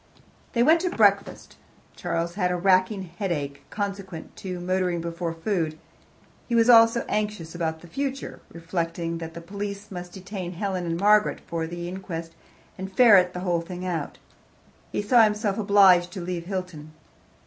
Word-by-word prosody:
They 235 - +3
went 320 +5 +4
into 365 - -2
breakfast. 200 -2 +2 0.4
Charles 170 +1 -2
had 180 -1 0
a 180 - 0
racking 185 +2 +2
headache, 165 -6 -4
consequent 195 -4 -6
on 180 -2 -5
motoring 185 -1 0
before 170 0 -3
food. 165 -2 -2 0.7
He 235 - +1
was 230 +1 +6
also 230 0 +6
anxious 210 -6 -2
about 160 -2 -3
the 175 - -13
future, 275 +8 -4
reflecting 165 0 -3
that 165 -1 -7
the 170 - -7
police 200 +3 -6
must 180 -1 -7
detain 190 -2 -6
Helen 185 -1 -3
and 165 0 -2
Margaret 210 +2 +4
for 165 -1 -4
the 175 +1 -6
inquest 175 -3 -6 0.5
and 190 +1 -5
ferret 190 -5 +6
the 180 - -4
whole 175 -2 0
thing 180 +1 -7
out. 165 -5 -3 0.7
He - - -2
saw 235 +3 +5
himself 210 -1 0
obliged 195 -4 +5
to 190 - -5
leave 175 -1 -4
Hilton. 180 -6 -5
185 Hz, 160 wpm, -25 LUFS, 170-205 Hz, 0.7 s, was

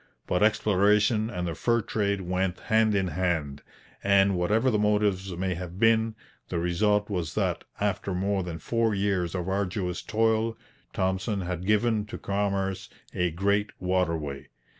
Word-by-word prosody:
But 90 - 0
exploration 105 +1 +3
and 90 -5 -3
the 85 - -2
fur 115 +6 +1
trade 100 -2 -1
went 90 0 -1
hand 110 -1 +2
in 95 -2 +1
hand; 80 -5 -1 0.4
and 100 0 +4
whatever 105 +9 +2
the 105 - +1
motives 105 -2 +1
may 95 0 -1
have 90 0 -7
been, 115 +1 +3 0.3
the 90 - -2
result 105 +5 +1
was 85 -7 -3
that, - - -1
after 95 - -1
more 100 +1 0
than 85 -2 -5
four 115 +5 0
years 95 -3 0
of 90 -1 -3
arduous 95 -2 -2
toil, 110 +1 +1 0.3
Thompson 95 +2 -1
had 90 0 -4
given 105 0 +2
to - - -6
commerce 100 -1 -2 0.2
a 90 0 +1
great 100 +5 0
waterway. 80 -7 -1
95 Hz, 150 wpm, -27 LUFS, 90-105 Hz, 0.4 s, and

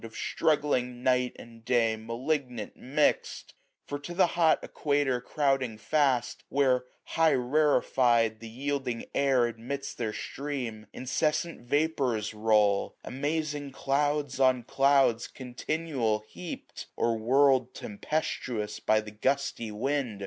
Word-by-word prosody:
Of 115 -1 -9
struggling 125 -5 0
night 125 -1 +2
and 115 -1 -13
day 115 -2 +2
malignant 120 +1 -3
mix'd! 145 +4 0 0.3
For 145 - -4
to 175 +4 -7
the 190 - +5
hot 165 -2 +4
equator 140 -4 0
crouding 135 -4 0
fast. 135 +1 +1
Where, 130 -2 +2 0.2
highly 160 -1 +2
rarefy 125 -3 +3
*d, 110 - -20
the 115 0 -9
yielding 135 0 -3
air 135 -3 +3
Admits 120 +4 -5
their 115 -3 -3
stream, 125 -4 -5
incessant 155 +6 -1
vapours 135 -7 0
roll, 105 -2 +2
790 - - -7
Amazing 150 -3 -2
clouds 145 0 0
on 130 -2 +4
clouds 135 -3 +3
continual 130 -3 -2
heap'd; 175 +7 -8
Or 115 -1 +1
whirled 130 +1 +3
tempestuous 115 -2 -3
by 110 0 +2
the 105 0 -10
gusty 120 +1 -1
wind. 120 0 -2
130 Hz, 120 wpm, -29 LUFS, 115-145 Hz, 0.3 s, the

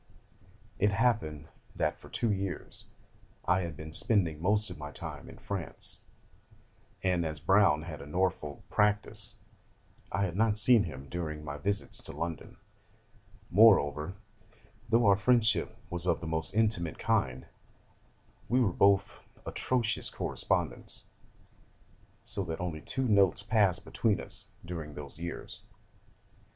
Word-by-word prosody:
It 105 - +4
happened 100 -10 0 0.3
that - - -1
for - - -14
two 115 - 0
years 95 -4 -4 0.6
I 90 +1 +3
had 85 -4 -5
been 80 0 -8
spending 85 -4 +1
most 105 +2 +1
of 90 - -9
my 75 -1 -6
time 75 - -8
in - - -12
France, 95 -7 -2 1.0
and 90 -2 +1
as 80 -2 -4
Browne 80 -2 +4
had 80 -3 -7
a 70 - -9
Norfolk 80 -3 -2
practice, 105 0 +1 0.8
I 100 - 0
had 90 -3 -2
not 110 0 +2
seen 110 0 +7
him 70 -5 -8
during 75 -2 -5
my 70 0 -5
visits 100 +6 -2
to - - -8
London. 85 -3 -5 0.9
Moreover, 90 -5 +5 0.7
though 115 0 +4
our 100 -1 +6
friendship 115 +1 +2
was 85 +1 -2
of 85 - +2
the 85 - -7
most 80 +3 0
intimate 105 -7 +1
kind, 65 -1 0 1.0
we 125 - +3
were 105 -8 +2
both 100 +1 +3 0.3
atrocious 120 -4 0
correspondents: - - 0 1.2
so 100 - 0
that 80 -2 -4
only 85 -3 -4
two 130 - 0
notes 100 -4 +3
passed 100 -3 +2
between 110 -3 0
us - - -3 0.2
during 80 -4 -6
those 75 +1 -9
years. 85 0 -7
90 Hz, 135 wpm, -30 LUFS, 80-105 Hz, 1.2 s, seen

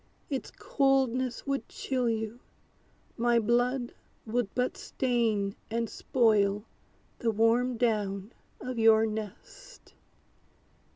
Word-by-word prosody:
Its 270 - -2
coldness 260 -3 +1
would 275 -1 -2
chill 255 -3 -1
you; 220 +1 -3 0.8
my 240 0 +3
blood 240 +2 +1 0.3
would 235 -1 -1
but 250 0 0
stain 225 -6 0
And 230 +1 -1
spoil 210 -4 +2 0.6
the 235 - +1
warm 230 +3 +2
down 210 -3 -1 0.3
of 255 -2 -4
your 225 0 +6
nest. 220 - -8
235 Hz, 100 wpm, -29 LUFS, 220-250 Hz, 0.8 s, your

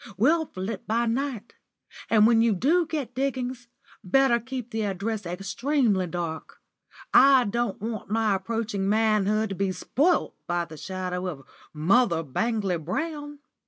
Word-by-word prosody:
We'll 310 +9 +3
flit 190 +2 -6
by 230 +3 +1
night. 240 -1 -3 0.6
And 215 -2 +5
when 225 0 +5
you 230 -3 +3
do 320 - +2
get 300 -6 -4
diggings, 255 -2 -3 0.4
better 240 +5 +3
keep 250 0 -6
the 220 - -2
address 205 0 -3
extremely 200 - 0
dark. 165 -2 -5 0.5
I 270 -1 +7
don't 235 -1 -2
want 220 -1 -5
my 220 -1 +2
approaching 200 0 -2
manhood 215 0 +2
to - - -3
be 195 0 0
spoilt 290 - +1
by 175 0 0
the 160 -1 -11
shadow 185 +3 -4
of 150 -7 -6 0.3
Mother 170 +2 +2
Bangley 200 - -1
Brown." 290 - -4
220 Hz, 140 wpm, -26 LUFS, 190-250 Hz, 0.6 s, I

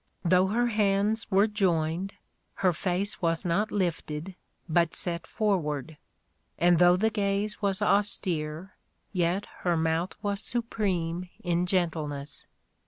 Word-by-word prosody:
Though 180 +2 +4
her 235 +5 +1
hands 210 -1 +1
were 195 +1 +5
joined, 185 -3 0 0.5
her 180 - +5
face 185 +5 -2
was 165 +1 0
not 195 +6 +1
lifted, 170 -2 -2 0.3
but 170 -1 +2
set 170 -1 0
forward; 160 - -1 0.6
and 175 -1 +4
though 175 0 +6
the 220 +4 +1
gaze 205 0 -1
was 200 0 0
austere, 185 -5 0 0.4
yet 180 +2 +1
her 175 -2 +1
mouth 160 +2 0
was 200 -1 -1
supreme 185 -7 -2
in 175 0 +1
gentleness. 155 -6 -2
180 Hz, 120 wpm, -28 LUFS, 165-200 Hz, 0.6 s, though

